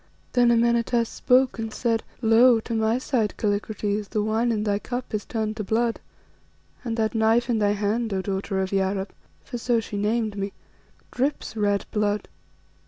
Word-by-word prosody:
Then 245 Hz, -1 st, +4 dB
Amenartas 235 Hz, 0 st, +2 dB
spoke 255 Hz, -1 st, +2 dB
and 225 Hz, -1 st, -3 dB
said 230 Hz, 0 st, 0 dB, 0.2 s
"'Lo! 230 Hz, +2 st, +6 dB
to 230 Hz, -, -5 dB
my 220 Hz, +1 st, +2 dB
sight, 245 Hz, -5 st, -1 dB
Kallikrates, 205 Hz, 0 st, -1 dB
the 215 Hz, -, 0 dB
wine 225 Hz, +3 st, +1 dB
in 215 Hz, -2 st, 0 dB
thy 205 Hz, -1 st, 0 dB
cup 245 Hz, +3 st, -5 dB
is 210 Hz, -1 st, -2 dB
turned 220 Hz, -1 st, -3 dB
to 215 Hz, -, -2 dB
blood, 230 Hz, +3 st, 0 dB, 0.8 s
and 230 Hz, -2 st, -3 dB
that 220 Hz, -1 st, 0 dB
knife 230 Hz, +2 st, +2 dB
in 225 Hz, -, +1 dB
thy 205 Hz, -1 st, +2 dB
hand, 210 Hz, +3 st, -1 dB
O 195 Hz, -, 0 dB
daughter 195 Hz, 0 st, -2 dB
of 190 Hz, -, -2 dB
Yarab' 195 Hz, 0 st, -1 dB, 0.3 s
for 245 Hz, -, -6 dB
so 235 Hz, 0 st, +1 dB
she 215 Hz, -2 st, -5 dB
named 215 Hz, +1 st, 0 dB
me 200 Hz, 0 st, -3 dB, 0.6 s
'drips 270 Hz, -2 st, -2 dB
red 205 Hz, -2 st, +1 dB
blood. 210 Hz, -1 st, 0 dB
220 Hz, 170 wpm, -25 LUFS, 205-235 Hz, 0.8 s, Lo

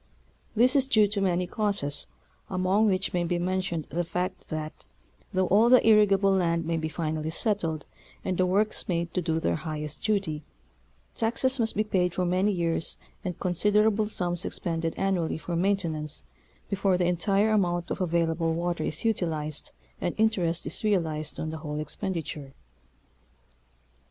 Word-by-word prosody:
This 250 Hz, +5 st, +4 dB
is 270 Hz, -1 st, +3 dB
due 215 Hz, -5 st, +5 dB
to 205 Hz, -1 st, -1 dB
many 180 Hz, -1 st, +1 dB
causes 180 Hz, -7 st, -2 dB, 0.4 s
among 190 Hz, +3 st, +2 dB
which 190 Hz, -1 st, 0 dB
may 175 Hz, -1 st, +1 dB
be 175 Hz, +1 st, 0 dB
mentioned 180 Hz, -2 st, -1 dB
the 175 Hz, +1 st, 0 dB
fact 180 Hz, +2 st, -3 dB
that, 155 Hz, 0 st, -5 dB, 0.4 s
though 185 Hz, 0 st, +2 dB
all 215 Hz, +6 st, +5 dB
the 250 Hz, -2 st, +6 dB
irrigable 200 Hz, -2 st, +5 dB
land 170 Hz, -3 st, +1 dB
may 165 Hz, +1 st, 0 dB
be 160 Hz, -1 st, -2 dB
finally 155 Hz, 0 st, -2 dB
settled 165 Hz, -5 st, -1 dB, 0.4 s
and 185 Hz, -, 0 dB
the 185 Hz, +1 st, +2 dB
works 205 Hz, +4 st, +1 dB
made 170 Hz, -2 st, -1 dB
to 180 Hz, -, 0 dB
do 160 Hz, -1 st, 0 dB
their 85 Hz, -, 0 dB
highest 150 Hz, -1 st, -5 dB
duty, 195 Hz, -8 st, 0 dB, 0.7 s
taxes 245 Hz, +4 st, 0 dB
must 225 Hz, -1 st, +1 dB
be 215 Hz, -, +2 dB
paid 180 Hz, -4 st, 0 dB
for 180 Hz, -, +1 dB
many 185 Hz, +4 st, +2 dB
years 170 Hz, -3 st, -1 dB, 0.3 s
and 180 Hz, -4 st, -4 dB
considerable 210 Hz, +4 st, +3 dB
sums 175 Hz, -4 st, -1 dB
expended 165 Hz, -2 st, -1 dB
annually 185 Hz, -5 st, 0 dB
for 170 Hz, +2 st, -4 dB
main 195 Hz, +4 st, +3 dB
tenance 155 Hz, -4 st, -3 dB, 0.4 s
before 195 Hz, -2 st, +1 dB
the 180 Hz, -, +1 dB
entire 195 Hz, +5 st, +2 dB
amount 175 Hz, -5 st, +1 dB
of -, -, -2 dB
available 165 Hz, -1 st, +1 dB
water 170 Hz, -1 st, -1 dB
is 160 Hz, +7 st, -3 dB
utilized, 160 Hz, -8 st, -1 dB, 0.3 s
and 175 Hz, -, -1 dB
interest 185 Hz, -6 st, +1 dB
is -, -, -3 dB
realized 160 Hz, -7 st, 0 dB
on 155 Hz, -, -3 dB
the 160 Hz, -, -5 dB
whole 150 Hz, -1 st, -4 dB
expenditure. 155 Hz, -5 st, -4 dB
180 Hz, 160 wpm, -27 LUFS, 165-200 Hz, 0.7 s, the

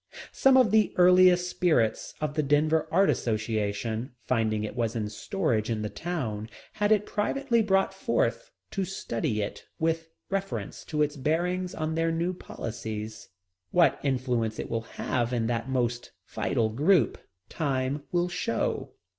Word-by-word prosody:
Some 270 Hz, -1 st, +5 dB
of 255 Hz, -4 st, +5 dB
the 215 Hz, -2 st, +3 dB
earnest 180 Hz, 0 st, +6 dB
spirits 155 Hz, -12 st, +1 dB
of 150 Hz, -1 st, -2 dB
the 155 Hz, -, +1 dB
Denver 150 Hz, +2 st, +2 dB
Art 195 Hz, +4 st, +4 dB
Association, 110 Hz, +1 st, -1 dB
finding 110 Hz, -3 st, +1 dB
it 110 Hz, -, -5 dB
was 115 Hz, -2 st, -1 dB
in 105 Hz, -2 st, -2 dB
storage 115 Hz, -, -1 dB
in 110 Hz, -2 st, -1 dB
the 105 Hz, -, -3 dB
town, 115 Hz, -11 st, -4 dB, 0.2 s
had 210 Hz, 0 st, +1 dB
it 210 Hz, -1 st, +4 dB
privately 235 Hz, +3 st, +1 dB
brought 195 Hz, -2 st, +2 dB
forth -, -, 0 dB, 0.2 s
to 195 Hz, -, -1 dB
study 115 Hz, -, -2 dB
it 100 Hz, -, -7 dB
with 165 Hz, 0 st, -1 dB, 0.2 s
reference 195 Hz, -1 st, -3 dB
to 150 Hz, -2 st, +1 dB
its 150 Hz, 0 st, -2 dB
bearing 175 Hz, +6 st, 0 dB
on 155 Hz, 0 st, -1 dB
their 165 Hz, +1 st, +1 dB
new 170 Hz, +3 st, 0 dB
policies. 110 Hz, -8 st, -6 dB, 0.4 s
What 175 Hz, -2 st, +4 dB
influence 125 Hz, -5 st, 0 dB
it -, -, -5 dB
will 115 Hz, -1 st, 0 dB, 0.2 s
have 120 Hz, -1 st, 0 dB
in 115 Hz, -2 st, 0 dB
that 115 Hz, +2 st, -2 dB
most 120 Hz, -2 st, -1 dB
vital 110 Hz, -1 st, 0 dB
group, 150 Hz, -, +3 dB, 0.3 s
time 140 Hz, -2 st, -1 dB
will 175 Hz, 0 st, +2 dB
show. 175 Hz, -, -2 dB
150 Hz, 150 wpm, -28 LUFS, 115-180 Hz, 0.4 s, earnest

